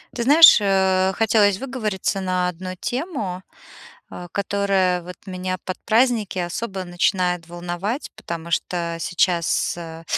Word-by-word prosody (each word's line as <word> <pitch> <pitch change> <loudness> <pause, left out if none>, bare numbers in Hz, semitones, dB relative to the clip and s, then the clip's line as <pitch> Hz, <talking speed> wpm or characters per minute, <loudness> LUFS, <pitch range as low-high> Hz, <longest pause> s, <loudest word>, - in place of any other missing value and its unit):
Ты 235 - -1
знаешь, 295 -2 +8
э, 190 -1 +2
хотелось 210 -3 +3
выговориться 215 -7 -3
на 185 -1 0
одну 185 +1 -6
тему, 245 - -4 0.7
э, 175 - -9
которая 195 -2 +1
вот 180 +1 -10
меня 185 0 -4
под 185 - -5
праздники 225 -4 +2
особо 190 +2 -4
начинает 180 -1 0
волновать, 175 - -4
потому 170 -5 -7
что 170 -1 -2
сейчас, 175 -1 0
э, 165 -1 -9
185 Hz, 125 wpm, -22 LUFS, 175-210 Hz, 0.7 s, знаешь